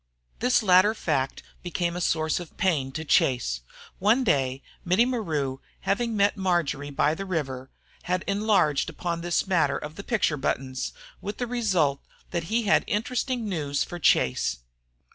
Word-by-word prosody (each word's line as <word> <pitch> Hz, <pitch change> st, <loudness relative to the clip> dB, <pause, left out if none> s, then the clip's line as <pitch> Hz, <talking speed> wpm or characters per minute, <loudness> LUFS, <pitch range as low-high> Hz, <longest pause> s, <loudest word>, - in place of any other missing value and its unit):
This 250 Hz, -1 st, +3 dB
latter 190 Hz, +2 st, +5 dB
fact 135 Hz, -9 st, -1 dB, 0.2 s
became 175 Hz, -1 st, -2 dB
a 180 Hz, -, -3 dB
source 160 Hz, -1 st, +1 dB
of 175 Hz, -3 st, -10 dB
pain 155 Hz, -9 st, +1 dB
to 160 Hz, +3 st, -4 dB
Chase. 120 Hz, -, +2 dB, 0.4 s
One 220 Hz, +7 st, +3 dB
day 135 Hz, -, +1 dB, 0.2 s
Mittie 185 Hz, +7 st, +3 dB
Maru, 155 Hz, -, -2 dB, 0.2 s
having 215 Hz, +4 st, 0 dB
met 200 Hz, +1 st, +3 dB
Marjory 170 Hz, -7 st, 0 dB
by 145 Hz, +2 st, +2 dB
the 195 Hz, -, -4 dB
river, 135 Hz, -8 st, -3 dB, 0.4 s
had 180 Hz, +1 st, 0 dB
enlarged 200 Hz, -8 st, +2 dB
upon 170 Hz, -1 st, -3 dB
this 175 Hz, 0 st, 0 dB
matter 180 Hz, -5 st, +2 dB
of 150 Hz, +1 st, -8 dB
the 200 Hz, -, -6 dB
picture 200 Hz, -10 st, +1 dB
buttons, 130 Hz, -1 st, -2 dB, 0.3 s
with 205 Hz, -, -5 dB
the 245 Hz, -, -1 dB
result 185 Hz, -, +1 dB, 0.3 s
that 170 Hz, -2 st, -2 dB
he 230 Hz, +5 st, 0 dB
had 210 Hz, -, +4 dB
interesting 240 Hz, +2 st, -1 dB
news 145 Hz, -7 st, -1 dB
for 175 Hz, -, -7 dB
Chase. 65 Hz, -, +2 dB
175 Hz, 155 wpm, -26 LUFS, 145-205 Hz, 0.4 s, latter